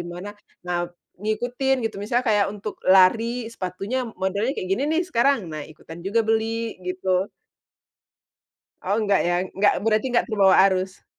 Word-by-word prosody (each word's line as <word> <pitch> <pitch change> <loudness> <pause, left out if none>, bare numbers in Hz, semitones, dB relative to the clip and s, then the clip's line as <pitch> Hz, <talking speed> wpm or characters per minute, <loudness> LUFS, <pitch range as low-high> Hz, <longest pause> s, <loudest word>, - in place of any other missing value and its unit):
mana, 185 +4 -7 0.4
nah 175 -1 -1 0.4
ngikutin 245 +5 0
gitu. 225 - -2
Misalnya 240 +4 0
kayak 205 -1 +3
untuk 210 0 -6 0.2
lari 225 +5 +3
sepatunya 195 +4 -4 0.3
modelnya 200 +6 0
kayak 185 - -4
gini 240 - 0
nih 330 +3 +2
sekarang, 275 -1 +3
nah 155 - -5
ikutan 165 +2 -12
juga 230 +4 +2
beli 225 +1 -1
gitu. 185 +1 0 1.5
Oh 200 +3 0
enggak 205 -3 +2
ya? 175 0 +1 0.2
Enggak 205 +1 +4
berarti 220 +3 +2
enggak 240 - +2
terbawa 200 -4 +4
arus. 185 0 -3
210 Hz, 145 wpm, -23 LUFS, 190-230 Hz, 1.5 s, Enggak